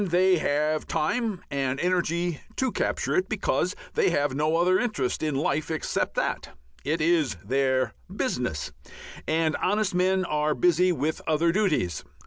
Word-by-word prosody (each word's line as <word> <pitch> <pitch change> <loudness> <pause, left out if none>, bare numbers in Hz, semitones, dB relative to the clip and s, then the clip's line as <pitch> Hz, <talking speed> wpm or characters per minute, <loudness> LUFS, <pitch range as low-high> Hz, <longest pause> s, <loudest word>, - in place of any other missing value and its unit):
They 185 0 +3
have 150 +1 0
time 195 +4 -1
and 135 -1 -1
energy 175 -2 0
to 260 -1 0
capture - - -1
it, 370 0 +1
because - - 0 0.2
they 450 -4 +3
have 145 -1 +1
no 155 +3 +1
other 180 +2 +3
interest 145 - -1
in 155 -2 -1
life 145 +2 0
except 160 -1 -2
that. 65 - -2 0.3
It 155 +3 -1
is 155 - +2
their 130 -1 +1 0.2
"business," - - -2 0.6
and 160 0 +1
honest 210 0 0
men 185 +1 +2
are 150 -2 0
busy 180 +1 +3
with 155 -1 -2
other 165 +1 +2
duties. 170 - 0
160 Hz, 145 wpm, -26 LUFS, 145-185 Hz, 0.6 s, They